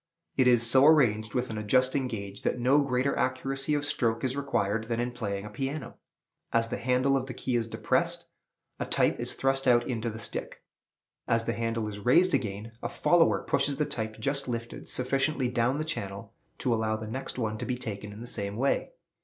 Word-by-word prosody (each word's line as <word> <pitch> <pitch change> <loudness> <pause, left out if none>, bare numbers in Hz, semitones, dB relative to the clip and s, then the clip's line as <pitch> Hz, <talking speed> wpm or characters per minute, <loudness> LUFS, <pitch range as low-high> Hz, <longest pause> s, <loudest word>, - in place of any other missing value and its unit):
It 130 - +4
is 120 -2 +5
so 130 +4 +6
arranged 110 -9 +4
with 125 -2 -1
an 110 - -3
adjusting 130 +5 +2
gauge 100 -4 -5
that - - 0
no 130 +4 +4
greater 130 0 +1
accuracy 135 +3 0
of 145 0 -1
stroke 115 -4 0
is 130 0 0
required 115 -6 0
than 115 0 -2
in 120 +1 -1
playing 105 -4 -4
a - - -6
piano. 135 +1 -4 0.5
As 115 0 +2
the - - -3
handle 130 +2 +2
of 130 -1 -1
the 125 - -6
key 130 -1 -2
is 115 -1 0
depressed, - - 0 0.5
a - - -2
type - - +2
is - - -4
thrust 135 0 +1
out 120 -1 +4
into 115 -2 -2
the 110 - -7
stick. 115 - -5 0.6
As 115 0 +1
the 115 - 0
handle 115 -1 -2
is 105 -1 -6
raised 170 - +4
again, 105 +1 -2
a - - -3
"follower" 175 -1 +3
pushes 140 - +1
the 150 - 0
type 110 -6 -4
just 140 +3 -1
lifted 115 -1 -5
sufficiently 135 +1 +1
down 125 +2 +1
the 155 - -2
channel 100 -11 -5 0.2
to 125 - 0
allow 110 -1 0
the 110 - -6
next 130 +5 -5
one 110 -3 -2
to - - -3
be 125 -1 -1
taken 105 -4 -5
in 105 +2 -10
the - - -6
same 100 -4 -3
way. 135 - 0
120 Hz, 205 wpm, -28 LUFS, 110-135 Hz, 0.6 s, so